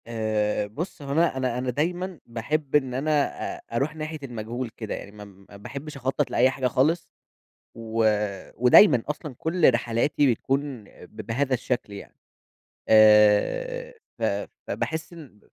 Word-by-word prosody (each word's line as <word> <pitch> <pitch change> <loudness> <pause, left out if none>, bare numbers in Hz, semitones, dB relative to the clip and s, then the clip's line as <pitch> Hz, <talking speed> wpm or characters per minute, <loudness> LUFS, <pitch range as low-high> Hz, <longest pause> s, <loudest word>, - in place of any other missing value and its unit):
آآ 110 -2 -1
بُص 155 - -6
هو 140 -1 -6
أنا 160 -1 +2
أنا 130 -2 -1
أنا 125 0 -2
دايمًا 175 +6 -2
باحِب 135 +6 -3
إن 130 -4 +2
أنا 140 +5 -1 0.5
أ - - -15
أروح 140 +6 -1
ناحية 155 0 -5
المجهول 120 0 -5
كده، 110 -1 -6
يعني 100 - -9
ما 105 0 -11
ما 100 0 -16
باحبش 140 +8 -8
أخطط 135 +2 -1
لأي 125 +2 +4
حاجة 130 -1 -1
خالص، 155 +7 +1 0.7
و 115 0 -2 0.6
ودايمًا 125 - +7
أصلًا 150 -2 -5
كلّ 160 -3 +3
رحلاتي 120 +4 +1
بتكون 135 0 -3
ب 100 - -17
بهذا 130 +5 -1
الشكل 125 -3 -2
يعني، 100 - -10 0.7
آآ 110 - +4 0.3
ف - - -4 0.4
فباحِس 160 +2 -3
إن 145 -11 -13
130 Hz, 145 wpm, -25 LUFS, 115-150 Hz, 0.7 s, ودايمًا